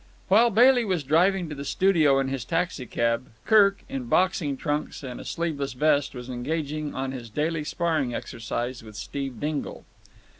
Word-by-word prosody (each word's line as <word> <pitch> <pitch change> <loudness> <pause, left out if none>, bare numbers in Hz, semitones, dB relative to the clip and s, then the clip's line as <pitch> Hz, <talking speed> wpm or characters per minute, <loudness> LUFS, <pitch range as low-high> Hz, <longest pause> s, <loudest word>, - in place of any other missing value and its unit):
While 225 +5 +6
Bailey 245 +3 +5
was 185 -7 -1
driving 175 +6 +2
to - - -5
the 140 -1 -6
studio 155 -4 +3
in 135 0 +1
his 135 -3 -3
taxicab, 125 -8 -1 0.2
Kirk, 200 -2 +5
in 135 -2 -4
boxing 155 0 +1
trunks 150 +1 -3
and 125 -2 -6
a - - -8
sleeveless 155 -6 -3
vest, 145 +1 +1
was 125 0 -7
engaged 140 +4 -3 0.2
on 130 0 -2
his 120 -3 -7
daily 155 +6 -1
sparring 155 -5 -1
exercise 120 +1 -4
with 110 -1 -12
Steve 135 +1 -5
Dingle. 150 -1 -4
145 Hz, 160 wpm, -26 LUFS, 130-170 Hz, 0.2 s, While